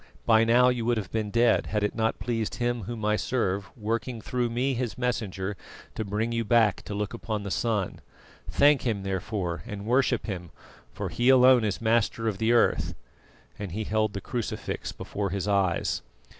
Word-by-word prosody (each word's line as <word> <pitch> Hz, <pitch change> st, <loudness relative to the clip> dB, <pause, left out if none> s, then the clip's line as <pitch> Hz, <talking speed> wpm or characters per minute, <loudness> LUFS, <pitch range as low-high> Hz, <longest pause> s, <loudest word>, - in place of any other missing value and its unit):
By 110 Hz, -1 st, +5 dB
now 125 Hz, +2 st, +5 dB
you 125 Hz, -2 st, -1 dB
would 120 Hz, 0 st, +2 dB
have 100 Hz, -4 st, -4 dB
been 110 Hz, -2 st, -1 dB
dead, 115 Hz, +1 st, +3 dB
had 105 Hz, -1 st, -1 dB
it 105 Hz, -, 0 dB
not 110 Hz, 0 st, 0 dB
pleased 115 Hz, 0 st, -2 dB
Him 120 Hz, -3 st, -1 dB
Whom 110 Hz, -1 st, -5 dB
I 105 Hz, 0 st, +3 dB
serve, 100 Hz, -7 st, -1 dB
working 115 Hz, +2 st, -2 dB
through 125 Hz, +1 st, -1 dB
me, 125 Hz, +4 st, 0 dB
His 120 Hz, -2 st, -3 dB
messenger, 105 Hz, -6 st, -2 dB, 0.4 s
to -, -, -3 dB
bring 105 Hz, +3 st, -2 dB
you 115 Hz, 0 st, 0 dB
back 110 Hz, -2 st, +3 dB
to 100 Hz, -, -5 dB
look 105 Hz, +1 st, -3 dB
upon 110 Hz, -2 st, -4 dB
the 100 Hz, -, -5 dB
sun. 105 Hz, -5 st, -1 dB, 0.5 s
Thank 145 Hz, 0 st, +4 dB
Him, 110 Hz, -5 st, -1 dB
therefore, 95 Hz, -2 st, -3 dB
and 100 Hz, 0 st, -6 dB
worship 125 Hz, +3 st, +2 dB
Him, 90 Hz, -5 st, -5 dB, 0.4 s
for -, -, -4 dB
He 120 Hz, +2 st, +1 dB
alone 130 Hz, -2 st, +7 dB
is 105 Hz, -3 st, -1 dB
Master 115 Hz, 0 st, +1 dB
of 105 Hz, -3 st, -2 dB
the 110 Hz, +1 st, +2 dB
Earth," 120 Hz, -, +2 dB, 0.6 s
and 100 Hz, -4 st, -5 dB
he 110 Hz, +3 st, -2 dB
held 110 Hz, 0 st, 0 dB
the 100 Hz, -, -4 dB
crucifix 120 Hz, +2 st, -4 dB
before 100 Hz, -1 st, -4 dB
his 100 Hz, +1 st, -2 dB
eyes. 95 Hz, -4 st, +1 dB
110 Hz, 185 wpm, -27 LUFS, 100-120 Hz, 0.6 s, alone